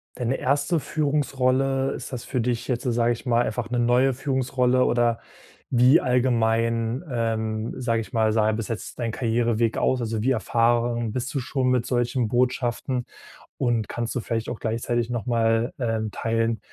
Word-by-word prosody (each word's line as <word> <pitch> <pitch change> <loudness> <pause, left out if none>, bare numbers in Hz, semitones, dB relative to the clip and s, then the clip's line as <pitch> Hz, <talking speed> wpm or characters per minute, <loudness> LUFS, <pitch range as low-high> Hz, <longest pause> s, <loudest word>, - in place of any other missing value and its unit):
deine 125 +1 -1
1. 145 +5 +1
Führungsrolle? 135 -3 0
Ist - - -7
das 120 - -4
für 130 - -3
dich 120 0 -2
jetzt, 125 -2 -1
sage 120 -1 +1
ich 120 - -9
mal, 120 -1 +3
einfach 120 -3 -3
'ne 120 0 0
neue 125 +3 +3
Führungsrolle 130 -1 +1
oder, 120 -1 +2 0.5
wie 125 +4 +5
allgemein, 115 0 +1
ähm, 110 -1 -2
sage 115 -2 0
ich 110 - -10
mal, 110 -2 +2
sah 110 -1 +2
denn 110 - +1
bis 115 -1 -4
jetzt 115 -2 -5
dein 115 -2 -2
Karriereweg 115 -1 0
aus, 130 - +1
also 110 -2 -2
wie 135 - +2
erfahren 120 -1 +1
bist 125 +2 -3
du 140 - 0
schon 130 +1 -1
mit 125 -2 +2
solchen 120 -1 0
Botschaften? 125 0 0 0.5
Und 120 -5 0
kannst 120 0 -3
du - - 0
vielleicht 115 -1 -3
auch - - -5
gleichzeitig 115 +1 -1
nochmal, 115 0 +1
ähm, 110 -3 -1
teilen, 115 +1 -1
120 Hz, 170 wpm, -24 LUFS, 115-130 Hz, 0.5 s, wie